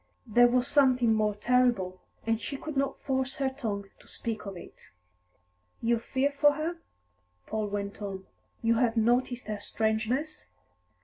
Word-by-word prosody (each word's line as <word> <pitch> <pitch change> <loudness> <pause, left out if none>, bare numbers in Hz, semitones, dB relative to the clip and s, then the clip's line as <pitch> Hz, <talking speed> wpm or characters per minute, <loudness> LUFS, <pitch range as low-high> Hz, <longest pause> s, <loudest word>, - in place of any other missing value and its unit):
There 245 +1 +6
was 245 +1 +2
something 255 -5 +4
more 215 -1 +1
terrible, 235 -5 +2 0.2
and 225 0 +1
she 275 - -4
could 310 +1 -6
not 275 0 0
force 265 -1 -1
her 270 -1 0
tongue 215 -7 -3
to - - -20
speak 220 -3 -5
of 195 -2 -6
it. - - -13 0.9
"You 235 0 +2
fear 265 +4 0
for 290 +1 +4
her?" 320 +3 -3 0.7
Paul 215 -1 -2
went 200 0 -4
on. 195 -2 -5 0.4
"You 230 0 +3
have 240 -2 +2
noticed 245 +2 +2
her 210 0 -4
strangeness?" 225 +9 -1
235 Hz, 150 wpm, -29 LUFS, 215-265 Hz, 0.9 s, There